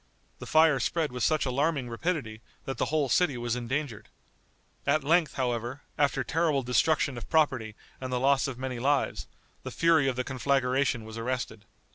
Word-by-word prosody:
The -, -, -8 dB
fire 155 Hz, -3 st, +5 dB
spread 155 Hz, +3 st, -1 dB
with 125 Hz, 0 st, -6 dB
such 155 Hz, -2 st, +2 dB
alarming 140 Hz, +1 st, 0 dB
rapidity 120 Hz, -3 st, -3 dB, 0.2 s
that 135 Hz, -3 st, -5 dB
the -, -, +2 dB
whole 150 Hz, -2 st, 0 dB
city 140 Hz, +1 st, +2 dB
was 120 Hz, 0 st, -2 dB
endangered. 125 Hz, -1 st, -4 dB, 0.8 s
At 155 Hz, -, +2 dB
length, 165 Hz, +2 st, +2 dB
however, 125 Hz, +1 st, -2 dB
after 140 Hz, -2 st, +1 dB
terrible 155 Hz, -2 st, +1 dB
destruction 130 Hz, +1 st, +1 dB
of -, -, -11 dB
property 130 Hz, -9 st, +1 dB, 0.3 s
and 130 Hz, -1 st, -4 dB
the 125 Hz, -, 0 dB
loss 135 Hz, +1 st, +3 dB
of 130 Hz, -3 st, -5 dB
many 130 Hz, -1 st, -4 dB
lives, 140 Hz, +3 st, 0 dB, 0.3 s
the -, -, -6 dB
fury 165 Hz, -4 st, +3 dB
of 130 Hz, -, 0 dB
the 125 Hz, -, -1 dB
conflagration 130 Hz, -1 st, 0 dB
was 110 Hz, +1 st, -8 dB
arrested. 115 Hz, -3 st, -4 dB
135 Hz, 170 wpm, -28 LUFS, 125-150 Hz, 0.8 s, fire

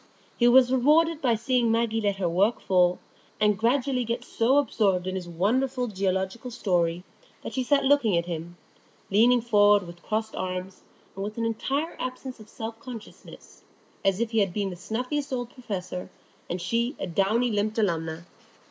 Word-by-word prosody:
He 240 Hz, -, +3 dB
was 250 Hz, 0 st, +6 dB
rewarded 305 Hz, +5 st, +3 dB
by 245 Hz, -4 st, +3 dB
seeing 235 Hz, +1 st, +1 dB
Maggie 225 Hz, -1 st, +1 dB
let 200 Hz, -2 st, +1 dB
her 190 Hz, -2 st, -1 dB
work 195 Hz, +7 st, +2 dB
fall, 180 Hz, -1 st, +3 dB, 0.4 s
and 210 Hz, -1 st, +3 dB
gradually 250 Hz, +4 st, +1 dB
get 235 Hz, 0 st, -3 dB
so 245 Hz, +5 st, +2 dB
absorbed 200 Hz, -10 st, +1 dB
in 185 Hz, -, -3 dB
his 180 Hz, -2 st, -5 dB
wonderful 250 Hz, +9 st, 0 dB
geological 190 Hz, +2 st, -2 dB
story 175 Hz, -6 st, 0 dB, 0.4 s
that -, -, -6 dB
she 260 Hz, -, 0 dB
sat 280 Hz, +2 st, +2 dB
looking 265 Hz, -9 st, +3 dB
at 170 Hz, -, 0 dB
him, 170 Hz, 0 st, -6 dB, 0.5 s
leaning 235 Hz, +4 st, +5 dB
forward 205 Hz, -3 st, +4 dB
with 175 Hz, 0 st, -11 dB
crossed 220 Hz, +2 st, -3 dB
arms, 185 Hz, 0 st, -4 dB, 0.3 s
and 195 Hz, -, -5 dB
with 210 Hz, +2 st, -5 dB
an 230 Hz, -, -1 dB
entire 275 Hz, +8 st, -2 dB
absence 255 Hz, 0 st, -5 dB
of 215 Hz, 0 st, -14 dB
self 225 Hz, -2 st, -7 dB
consciousness, 235 Hz, -3 st, -11 dB, 0.4 s
as 195 Hz, 0 st, +2 dB
if 235 Hz, -1 st, -1 dB
he 225 Hz, -, +2 dB
had 195 Hz, -4 st, 0 dB
been 200 Hz, -2 st, -1 dB
the -, -, -6 dB
snuffiest 250 Hz, -, -3 dB
of 260 Hz, -, 0 dB
old 245 Hz, -1 st, -5 dB
professors, 185 Hz, -7 st, -6 dB, 0.4 s
and 175 Hz, -, -2 dB
she 235 Hz, -, -1 dB
a -, -, -2 dB
downy 210 Hz, +7 st, +1 dB
lipped 215 Hz, +1 st, -1 dB
alumna. 165 Hz, -5 st, -1 dB
220 Hz, 175 wpm, -26 LUFS, 185-245 Hz, 0.5 s, was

